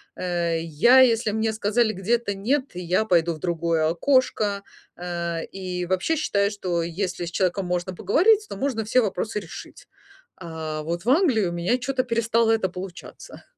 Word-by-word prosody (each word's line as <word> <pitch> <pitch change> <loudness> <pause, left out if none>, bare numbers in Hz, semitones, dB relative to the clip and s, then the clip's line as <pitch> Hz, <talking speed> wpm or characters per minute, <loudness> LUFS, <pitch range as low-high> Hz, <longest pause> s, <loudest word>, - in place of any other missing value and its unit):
Э, 170 -2 -1
я 165 - +4
если 230 -4 +4
мне 220 +1 0
сказали 220 +2 +1
где-то 205 +2 -1
"нет", 260 +8 -1
я 180 +3 0
пойду 170 -4 +2
в 155 - -10
другое 165 -2 0
окошко. 205 - +1 0.3
Э, 170 -1 -3
и 180 -2 -5
вообще 185 - 0
считаю, 200 -9 +1
что 180 -5 -2
если 175 +1 -3
с 170 - -6
человеком 185 +1 0
можно 180 +1 -2
поговорить, 400 - +3
то - - -6
можно 235 -3 -2
все 250 +4 +3
вопросы 210 0 -2
решить. 170 -5 -11 0.5
А 160 -3 -5
вот 170 +5 -4
в - - +1
Англии 265 - +3
у 175 - -2
меня 180 +9 0
чё-то 255 +1 -1
перестало 230 -1 +1
это 220 -4 +1
получаться. 180 0 -10
195 Hz, 165 wpm, -24 LUFS, 175-230 Hz, 0.5 s, я